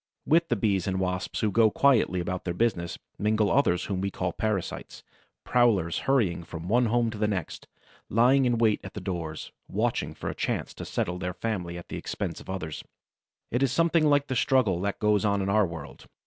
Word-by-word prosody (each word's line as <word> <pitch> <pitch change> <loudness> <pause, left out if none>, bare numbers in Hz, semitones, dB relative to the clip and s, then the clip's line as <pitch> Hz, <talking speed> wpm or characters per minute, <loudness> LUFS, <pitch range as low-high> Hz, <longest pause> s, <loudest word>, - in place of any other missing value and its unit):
With 165 +2 +3
the 120 - +2
Bees 100 -3 0
and 95 -1 -1
Wasps 90 0 -2
who 110 - +1
go 110 +2 +5
quietly 115 -7 +3
about 90 +1 -3
their 85 -1 -3
business, 90 -6 0 0.2
mingle 105 0 +2
others 90 -11 +2
whom 95 -2 -2
we 100 - -1
call 90 -2 -3
parasites, 105 -5 -3 0.4
prowlers 105 -9 +2
hurrying 100 -11 +2
from 80 +1 -8
one 120 +4 +3
home 115 0 +1
to 110 - -8
the 105 - +2
next, 95 -6 -4 0.4
lying 125 +5 +4
in 120 -1 +2
wait 110 -2 +3
at - - -9
the - - -3
doors, 85 -5 -5 0.2
watching - - -1
for - - -6
a - - -6
chance - - -2
to - - -8
settle 90 +1 -2
their 90 -1 -4
family 90 -6 -3
at 85 - -10
the - - -5
expense - - -4
of - - -14
others. 90 -5 -5 0.7
It 120 - 0
is 135 -3 +2
something 165 0 +3
like 145 -1 +3
the 130 - -3
struggle 115 -8 +2
that 100 +1 -2
goes 105 -1 +2
on 100 -1 +2
in 95 0 -1
our 105 -1 +3
world. 80 -4 -9
105 Hz, 205 wpm, -27 LUFS, 90-120 Hz, 0.7 s, go